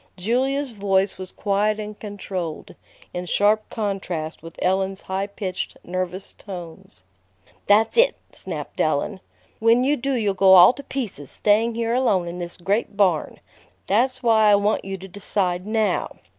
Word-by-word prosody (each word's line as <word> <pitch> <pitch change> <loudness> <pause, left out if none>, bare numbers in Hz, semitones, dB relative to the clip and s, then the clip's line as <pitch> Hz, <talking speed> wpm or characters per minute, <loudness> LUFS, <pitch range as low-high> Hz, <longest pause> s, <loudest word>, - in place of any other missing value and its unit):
Julia's 260 +7 0
voice 195 -2 0
was 185 -1 -7
quiet 210 +1 0
and 210 0 -7
controlled, 190 -6 -6 0.4
in 180 0 -4
sharp 210 +4 +2
contrast 190 -7 -4
with 165 0 -11
Ellen's 190 +1 0
high 190 +1 -2
pitched, 195 -2 -5
nervous 185 +1 -4
tones. 170 - -9 0.6
"That's 220 - +4
it!" - - +5 0.2
snapped - - -6
Ellen. - - 0 0.4
"When 230 +2 +4
you 285 +3 +3
do, 275 +1 -2
you'll 210 -4 +1
go 190 0 +5
all 180 +6 +9
to 280 - -10
pieces, 225 - -5
staying 220 +2 +2
here 230 0 -1
alone 215 -9 +2
in 175 +1 -6
this 175 -1 -5
great 200 +3 -1
barn. 185 -7 +1 0.4
That's 255 +6 +1
why 220 -2 +5
I 205 - +7
want 205 +1 +1
you 195 0 -4
to 190 +1 -10
decide 185 -1 -2
now. 220 -1 0
200 Hz, 155 wpm, -23 LUFS, 185-225 Hz, 0.6 s, all